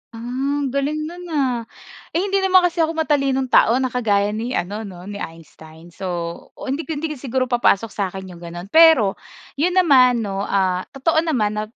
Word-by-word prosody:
Ah, 225 - -8 0.4
ang 265 - -2
galing 290 +3 -1
no'n, 350 +3 -8
ah. 255 -4 0 0.5
Eh, 340 - +2
hindi 395 0 +1
naman 375 -1 +4
kasi 350 -1 0
ako 325 0 +1
matalinong 275 -4 0
tao 230 - +5
na 260 -1 0
kagaya 205 -4 +1
ni 230 +4 -3
ano 205 +4 -3
'no 180 -2 -11
ni 200 +1 -7
Einstein. 160 +1 -11
So, 190 +2 -7 0.5
o - - -11
hindi 280 +6 -3
ko 320 - -3
hindi 305 +1 -3
ko 300 - -6
siguro 260 0 -1
papasok 230 -3 +1
sa'kin 190 -2 -4
yung 175 - -12
gano'n. 175 +3 -9
Pero, 320 -12 +6 0.4
'yon 360 +4 +1
naman 255 -9 +5
'no, 195 -1 -3
ah, 185 -2 0
totoo 315 +4 +2
naman 215 -10 0
na - - -1
250 Hz, 195 wpm, -20 LUFS, 200-310 Hz, 0.5 s, Pero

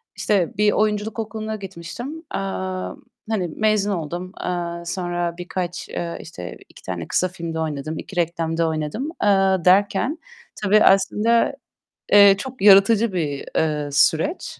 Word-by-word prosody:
işte 190 -6 0
bir 210 0 +4
oyunculuk 210 +1 0
okuluna 220 0 -4
gitmiştim, 195 - -7 0.2
eee, - - -1 0.9
hani, 205 -5 0
mezun 215 -2 +2
oldum. 175 +1 -4
Eee, 170 -1 -3
sonra 175 -1 -3
birkaç, 180 0 -5
eee, 170 -1 -4
işte, 90 - -9
2 - - -16
tane 85 -3 -5
kısa 185 - +1
filmde 170 -2 -5
oynadım, 155 0 -3
2 195 - -9
reklamda 165 -1 0
oynadım, 160 - -3
eee, 210 - +4 0.4
derken 200 - +3 0.5
tabii 210 +1 +5
aslında, 210 +6 +3 0.6
eee, 200 -1 +8
çok 255 +2 -7
yaratıcı 200 +2 +6
bir, 150 -6 -2
eee, 150 -2 0
süreç. 160 - +1
185 Hz, 130 wpm, -22 LUFS, 165-210 Hz, 0.9 s, eee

